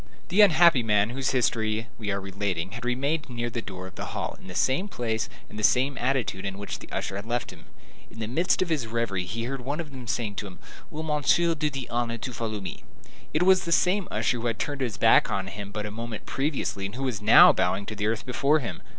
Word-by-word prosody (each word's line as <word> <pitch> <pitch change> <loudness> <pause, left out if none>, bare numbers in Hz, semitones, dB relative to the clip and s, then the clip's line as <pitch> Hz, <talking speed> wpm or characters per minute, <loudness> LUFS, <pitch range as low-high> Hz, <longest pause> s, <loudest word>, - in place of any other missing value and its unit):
The 195 +5 +5
unhappy 170 -7 +6
man 105 -1 +2
whose 130 +1 -1
history 110 -3 0
we 105 -3 -4
are 100 0 0
relating 95 -2 -3
had 115 +3 -7
remained 140 +5 -1
near 120 -1 -3
the 115 - -3
door 95 -3 -8
of 95 - -10
the - - -6
hall, - - -3
in - - -13
the 90 - -8
same 130 - +1
place 115 - -2 0.2
and 105 - -9
the - - -4
same 130 +5 +3
attitude 120 -7 0
in 95 -1 -4
which 100 0 -5
the - - -13
usher 95 - -3
had 100 +2 -7
left 120 0 -2
him. - - -16 0.4
In - - -15
the 110 -1 -3
midst 170 +10 +2
of 180 - -7
his 145 -8 0
reverie 110 -5 -1
he 115 +5 -4
heard 135 +3 -3
some 125 - -11
one 140 -4 -5
saying 110 -2 -1
to 105 - -3
him, 90 - -11 0.3
"Will 155 +1 -5
Monsieur 160 +2 +2
do 155 -1 -1
me - - +1
the 135 -3 -6
honor 120 -1 -1
to 125 +2 -6
follow 110 -2 -3
me?" 95 - -7 0.5
It 155 +4 +2
was 185 0 +5
the 170 - -3
same 185 +3 +3
usher 115 +3 0
who 120 - -2
had 115 -2 -1
turned 145 -2 -3
his 115 -7 -2
back - - +5
upon 95 -1 -2
him 100 +1 -7
but 105 0 -4
a 105 - -5
moment 115 0 -6
previously, 135 -8 -2
and 100 - -10
who 135 - -4
was 120 -6 -2
now 105 +2 +8
bowing 100 +2 0
to 110 - -6
the 105 0 -1
earth 115 +1 -1
before 140 +4 +2
him. 115 - -5
115 Hz, 250 wpm, -26 LUFS, 105-140 Hz, 0.5 s, now